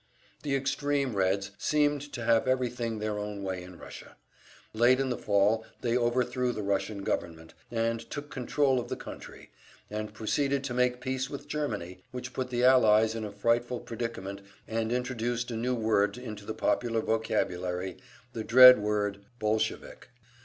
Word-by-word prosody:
The 140 Hz, -2 st, -1 dB
extreme 140 Hz, -2 st, 0 dB
Reds 95 Hz, +1 st, +1 dB
seemed 145 Hz, -1 st, +2 dB
to 120 Hz, -, -4 dB
have 115 Hz, +2 st, +3 dB
everything 125 Hz, -3 st, 0 dB
their 105 Hz, -1 st, -2 dB
own 105 Hz, -1 st, -5 dB
way 95 Hz, -1 st, -3 dB
in 90 Hz, -1 st, -11 dB
Russia. -, -, -11 dB, 0.6 s
Late 120 Hz, +4 st, +4 dB
in 135 Hz, -1 st, 0 dB
the -, -, 0 dB
fall 105 Hz, +2 st, +2 dB, 0.2 s
they 120 Hz, -1 st, 0 dB
overthrew 125 Hz, +1 st, +1 dB
the 105 Hz, -, -4 dB
Russian 100 Hz, 0 st, -1 dB
government, 80 Hz, -3 st, -3 dB, 0.2 s
and 115 Hz, 0 st, 0 dB
took 145 Hz, 0 st, -6 dB
control 135 Hz, 0 st, +1 dB
of 120 Hz, -, -5 dB
the -, -, -3 dB
country, -, -, -10 dB, 0.4 s
and 105 Hz, 0 st, -4 dB
proceeded 135 Hz, +6 st, 0 dB
to 135 Hz, -3 st, -3 dB
make 125 Hz, 0 st, +1 dB
peace 130 Hz, 0 st, -2 dB
with 145 Hz, 0 st, -7 dB
Germany; 105 Hz, -, -4 dB
which 125 Hz, 0 st, -7 dB
put 130 Hz, -1 st, -3 dB
the 120 Hz, -1 st, -1 dB
Allies 110 Hz, -4 st, +5 dB
in 115 Hz, -1 st, -4 dB
a 105 Hz, -, -5 dB
frightful 120 Hz, +4 st, 0 dB
predicament, 115 Hz, -5 st, -5 dB, 0.3 s
and 115 Hz, 0 st, -1 dB
introduced 120 Hz, -1 st, -2 dB
a -, -, -3 dB
new 125 Hz, +3 st, 0 dB
word 110 Hz, -2 st, +1 dB
into 110 Hz, -5 st, -8 dB
the 110 Hz, -, -4 dB
popular 115 Hz, -2 st, 0 dB
vocabulary, 95 Hz, -5 st, -1 dB, 0.4 s
the 110 Hz, -, -4 dB
dread 125 Hz, +1 st, +9 dB
word 105 Hz, -1 st, -1 dB, 0.2 s
"Bolshevik." 110 Hz, +2 st, -2 dB
115 Hz, 160 wpm, -29 LUFS, 105-125 Hz, 0.6 s, dread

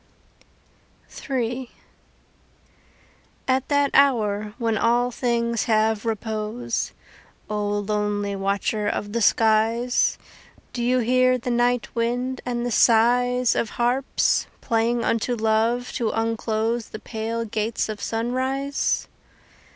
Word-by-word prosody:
III 245 Hz, -1 st, -2 dB, 1.8 s
At 260 Hz, 0 st, +1 dB
that 285 Hz, -1 st, +2 dB
hour 215 Hz, -6 st, +2 dB
when 230 Hz, -3 st, 0 dB
all 240 Hz, +3 st, +2 dB
things 235 Hz, -1 st, 0 dB
have 220 Hz, -1 st, +1 dB
repose, 220 Hz, +1 st, -3 dB, 0.6 s
O 210 Hz, -1 st, -2 dB
lonely 205 Hz, -1 st, -1 dB
watcher 200 Hz, +2 st, -1 dB
of 205 Hz, 0 st, -3 dB
the 235 Hz, -, 0 dB
skies, 225 Hz, +3 st, +2 dB, 0.6 s
Do 240 Hz, -, -3 dB
you 250 Hz, +1 st, +2 dB
hear 255 Hz, +2 st, +3 dB
the 245 Hz, 0 st, -4 dB
night 240 Hz, 0 st, +1 dB
wind 245 Hz, +2 st, -1 dB
and 240 Hz, -1 st, -2 dB
the 245 Hz, -, -2 dB
sighs 245 Hz, +2 st, +4 dB
Of 230 Hz, -, -1 dB
harps 245 Hz, +3 st, +1 dB
playing 230 Hz, 0 st, 0 dB
unto 230 Hz, +2 st, 0 dB
Love 225 Hz, +2 st, +1 dB
to 230 Hz, -3 st, -1 dB
unclose 225 Hz, 0 st, -1 dB
The -, -, -7 dB
pale 230 Hz, +1 st, -4 dB
gates 220 Hz, +1 st, -2 dB
of 215 Hz, -2 st, -6 dB
sunrise? 260 Hz, +5 st, -1 dB
230 Hz, 110 wpm, -23 LUFS, 220-245 Hz, 1.8 s, sighs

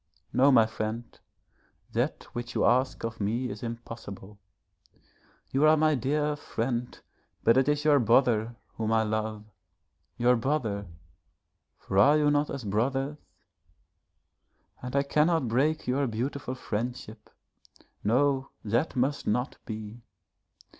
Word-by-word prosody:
No, 135 Hz, +3 st, +5 dB
my 115 Hz, -4 st, +6 dB
friend, 110 Hz, +1 st, -5 dB, 0.7 s
that -, -, -1 dB
which 120 Hz, 0 st, -5 dB
you -, -, +2 dB
ask 130 Hz, +2 st, +2 dB
of 115 Hz, -1 st, -4 dB
me 115 Hz, +5 st, -1 dB
is 105 Hz, -, -8 dB
impossible. 115 Hz, -4 st, -8 dB, 1.1 s
You 135 Hz, +3 st, +2 dB
are 155 Hz, 0 st, +6 dB
my 155 Hz, 0 st, +3 dB
dear 150 Hz, +3 st, 0 dB
friend, 120 Hz, -3 st, -3 dB, 0.4 s
but 115 Hz, -, +5 dB
it 130 Hz, +2 st, +3 dB
is 150 Hz, 0 st, 0 dB
your 145 Hz, -2 st, +5 dB
brother 115 Hz, -1 st, +3 dB, 0.2 s
whom 110 Hz, -1 st, -1 dB
I 110 Hz, 0 st, +3 dB
love 110 Hz, 0 st, -3 dB, 0.7 s
your 125 Hz, +1 st, +4 dB
brother, 115 Hz, -6 st, -1 dB, 0.9 s
for 95 Hz, -, -1 dB
are 145 Hz, +8 st, +6 dB
you 150 Hz, -1 st, +3 dB
not 145 Hz, 0 st, +1 dB
as 135 Hz, -, -5 dB
brothers, 135 Hz, +8 st, -1 dB, 1.6 s
and 125 Hz, +2 st, -6 dB
I 140 Hz, -, +3 dB
cannot 150 Hz, 0 st, +2 dB
break 140 Hz, +7 st, +1 dB
your 135 Hz, +2 st, +1 dB
beautiful 130 Hz, +3 st, -3 dB
friendship. 115 Hz, -2 st, -5 dB, 0.7 s
No, 135 Hz, +4 st, +2 dB, 0.2 s
that 120 Hz, +10 st, 0 dB
must 135 Hz, +3 st, 0 dB
not 125 Hz, +6 st, -1 dB
be. 110 Hz, +1 st, -7 dB
125 Hz, 125 wpm, -28 LUFS, 110-140 Hz, 1.6 s, my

